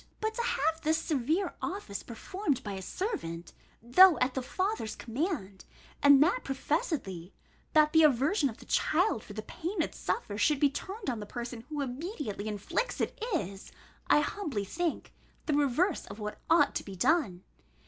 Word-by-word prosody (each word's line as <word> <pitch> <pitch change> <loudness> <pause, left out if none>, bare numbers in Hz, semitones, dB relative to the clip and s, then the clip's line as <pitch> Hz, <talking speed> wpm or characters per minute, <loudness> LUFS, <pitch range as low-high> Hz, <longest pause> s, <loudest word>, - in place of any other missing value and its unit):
But 435 0 -1
to 470 - -2
have 320 - 0
this 315 +1 +2
severe 320 +5 0
office 360 - -4
performed 275 - -3
by 205 - -4
a 190 -1 -5
servant, 175 - -4 0.3
though 340 +9 +7
at 255 +1 +1
the 265 - -2
father's 370 - -2
command, 235 - -3 0.4
and 285 0 +8
that 370 +10 +2
professedly, 270 - -2 0.4
that 305 -1 +5
the 320 - +7
aversion 295 - +3
of 225 - -9
the - - -14
child 330 - +1
for 205 - -10
the 215 +1 -5
pain 350 - -5
it 315 - 0
suffers 210 - -3
should 300 -3 +3
be 285 -1 +4
turned 395 +7 -6
on 235 - -4
the 210 - -7
person 240 0 -6
who 300 -2 -3
immediately 270 - -4
inflicts 210 - -2
it, 445 - -2
is, 195 - -4 0.4
I 295 - +5
humbly 295 - -3
think, 335 - -3 0.3
the 305 - 0
reverse 295 +5 +1
of 200 - -9
what 210 -1 -6
ought 330 +1 +5
to - - -6
be 195 - -8
done. 205 - +1
285 Hz, 170 wpm, -30 LUFS, 215-340 Hz, 0.4 s, and